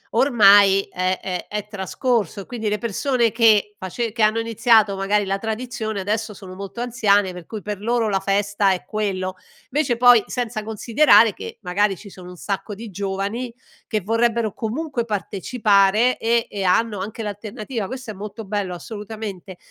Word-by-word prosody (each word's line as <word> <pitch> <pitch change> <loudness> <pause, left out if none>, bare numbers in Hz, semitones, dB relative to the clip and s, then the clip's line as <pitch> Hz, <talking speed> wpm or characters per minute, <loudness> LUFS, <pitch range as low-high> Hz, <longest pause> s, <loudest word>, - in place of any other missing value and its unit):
ormai 205 -6 +6
è 185 +1 -1
è 180 -2 -5
è 210 0 -4
trascorso 210 +1 -1
e - - -11
quindi 225 -3 -3
le 210 - 0
persone 235 +2 0
che 215 -3 +4
face 220 +5 -3
che 225 0 -4
hanno 215 +1 +4
iniziato 225 -2 +3
magari 200 +1 +1
la 195 0 -1
tradizione, 220 -1 -4
adesso 210 +2 -2
sono 185 -1 -10
molto 195 +4 -7
anziane 205 -6 +2
per 180 -2 -10
cui 215 -3 -7
per 210 -2 -4
loro 230 +1 +1
la 195 - +1
festa 200 0 +1
è 180 - -5
quello. 190 -3 -2 0.4
Invece, 270 -4 +1
poi, 245 -3 +7
senza 240 -3 -3
considerare 225 +1 +4
che - - -9
magari 195 +1 0
ci 205 - -12
sono 180 -1 -11
un 180 - -10
sacco 200 +2 -4
di 220 +1 -9
giovani 200 +5 -3 0.4
che 215 -2 -1
vorrebbero 230 +1 0
comunque 255 +2 -3
partecipare 210 +2 +2
e 230 0 +1
e 200 -1 -4
hanno 205 +2 +2
anche 220 +3 -5
l'alternativa; 210 +1 -5
questo 255 -3 -7
è - - -8
molto 210 +2 -8
bello 195 -3 -3
assolutamente. 205 -2 -7
210 Hz, 165 wpm, -22 LUFS, 195-230 Hz, 0.4 s, poi